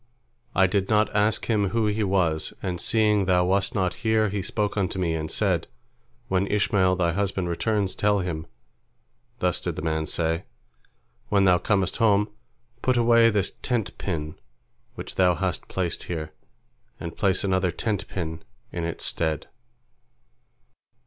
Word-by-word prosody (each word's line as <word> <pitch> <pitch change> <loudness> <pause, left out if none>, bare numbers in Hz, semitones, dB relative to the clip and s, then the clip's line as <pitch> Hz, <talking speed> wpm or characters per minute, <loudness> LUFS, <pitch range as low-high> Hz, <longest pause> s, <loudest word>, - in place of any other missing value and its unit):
I 95 - +5
did 95 +1 0
not 105 -1 +2
ask 105 +1 +2
him 105 -4 +1
who 115 +3 +1
he 105 +1 0
was, 90 -5 +1
and 90 -2 -2
seeing 105 -3 +3
thou 90 -1 +3
wast 95 +2 +1
not 95 -3 +1
here, 110 -2 +2
he 100 0 -2
spoke 105 +2 -2
unto 95 -3 -1
me, 85 -3 0
and 80 -1 -3
said, - - 0 0.6
When 95 +1 +1
Ishmael 100 -3 +2
thy 85 -2 +1
husband 95 -1 -1
returns, 100 +2 0
tell 105 +1 +2
him, 85 -4 -3 0.9
Thus - - 0
did - - -3
the - - -5
man 80 -1 -1
say, 80 0 -1 0.8
When 100 -1 +3
thou 90 -2 +5
comest 95 -3 0
home, 105 -2 +3 0.5
put 130 -1 +2
away 115 -1 +5
this 100 -3 +1
tent 120 -5 -1
pin 75 -5 -4 0.6
which - - -7
thou 90 -2 +4
hast - - -2
placed 90 -3 -2
here, 80 -3 -5 0.7
and 85 - -6
place 95 -3 +1
another 95 -2 +1
tent 105 +2 -2
pin 80 -3 -5 0.3
in 85 - -4
its 85 - -4
stead." 80 -3 -1
95 Hz, 155 wpm, -25 LUFS, 85-105 Hz, 0.9 s, I